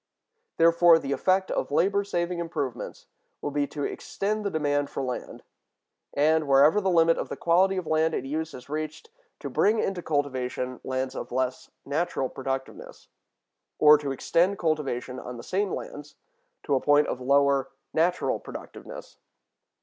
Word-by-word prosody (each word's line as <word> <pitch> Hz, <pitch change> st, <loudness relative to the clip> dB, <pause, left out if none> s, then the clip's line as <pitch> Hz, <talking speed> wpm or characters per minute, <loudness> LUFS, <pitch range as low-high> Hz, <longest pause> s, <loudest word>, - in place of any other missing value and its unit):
Therefore, 170 Hz, 0 st, +6 dB
the 140 Hz, -4 st, -4 dB
effect 190 Hz, +6 st, +1 dB
of -, -, -1 dB
labor 200 Hz, +7 st, +2 dB
saving 175 Hz, -3 st, -2 dB
improvements 155 Hz, -7 st, -4 dB, 0.3 s
will 145 Hz, -, -4 dB
be 145 Hz, 0 st, 0 dB
to 145 Hz, 0 st, -5 dB
extend 210 Hz, +8 st, -3 dB
the 200 Hz, -, 0 dB
demand 145 Hz, -3 st, 0 dB
for 135 Hz, -, -4 dB
land, 125 Hz, -1 st, -5 dB, 0.7 s
and, 155 Hz, +1 st, +3 dB
wherever 140 Hz, +8 st, +5 dB
the 190 Hz, -, +1 dB
limit 165 Hz, -2 st, +4 dB
of -, -, -4 dB
the -, -, -5 dB
quality 185 Hz, +3 st, +3 dB
of 185 Hz, -, -3 dB
land 160 Hz, +1 st, +1 dB
in 125 Hz, -, -3 dB
use 160 Hz, +3 st, -3 dB
is 125 Hz, -, -11 dB
reached, 155 Hz, -, -5 dB, 0.3 s
to -, -, -4 dB
bring 215 Hz, +3 st, +2 dB
into 190 Hz, -4 st, -1 dB
cultivation 130 Hz, -4 st, -2 dB
lands 130 Hz, 0 st, -2 dB
of -, -, -6 dB
less 130 Hz, 0 st, -2 dB, 0.2 s
natural 145 Hz, -2 st, -1 dB
productiveness, 135 Hz, 0 st, -6 dB, 0.7 s
or 150 Hz, 0 st, +8 dB
to 145 Hz, -2 st, -3 dB
extend 175 Hz, +8 st, +1 dB
cultivation 135 Hz, -6 st, -2 dB
on 125 Hz, -1 st, -8 dB
the 120 Hz, -, -9 dB
same 195 Hz, 0 st, -1 dB
lands 145 Hz, 0 st, -7 dB, 0.5 s
to -, -, -1 dB
a 130 Hz, -, +2 dB
point 145 Hz, 0 st, +4 dB
of 130 Hz, -, -4 dB
lower 140 Hz, 0 st, +3 dB, 0.2 s
natural 170 Hz, +3 st, +1 dB
productiveness. -, -, -10 dB
150 Hz, 155 wpm, -26 LUFS, 135-175 Hz, 0.7 s, or